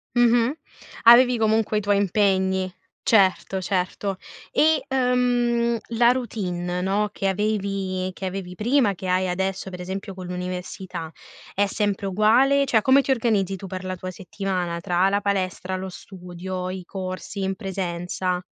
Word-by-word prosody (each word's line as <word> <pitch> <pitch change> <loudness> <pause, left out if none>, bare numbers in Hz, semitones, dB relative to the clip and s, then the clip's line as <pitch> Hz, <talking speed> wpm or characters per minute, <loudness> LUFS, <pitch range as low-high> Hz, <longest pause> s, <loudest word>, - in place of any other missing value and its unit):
Mh-mh. 240 +1 +4 0.5
Avevi 245 +1 +7
comunque 220 -1 +2
i 210 - +1
tuoi 205 0 +2
impegni. 190 -2 +1 0.3
Certo, 190 -2 +3
certo. 190 +1 -2 0.3
E, 315 0 +3
uhm, 245 -2 +2 0.2
la 240 0 +6
routine, 180 -8 -3
no, 205 +3 0
che 195 - -2
avevi 195 -2 -1
che 190 - -6
avevi 185 -1 -5
prima, 235 -1 +2
che 185 +1 -7
hai 185 +1 +1
adesso, 190 +1 -2
per 180 0 -7
esempio 195 +2 -5
con 185 -1 -8
l'università, 180 -2 -5 0.4
è 205 - +3
sempre 205 -1 -1
uguale? 245 +8 +4
Cioè 225 -5 +3
come 265 +1 +6
ti 275 - -9
organizzi 210 -6 +1
tu 195 - -9
per 185 0 -6
la 185 0 -3
tua 185 +1 -6
settimana, 180 -1 -3
tra 180 +3 +2
la 200 +1 +1
palestra, 190 -2 -1
lo 190 0 -5
studio, 180 0 -7
i 185 -1 -5
corsi 185 +1 -5
in 190 0 -1
presenza? 180 -2 -3
195 Hz, 150 wpm, -24 LUFS, 185-220 Hz, 0.5 s, Avevi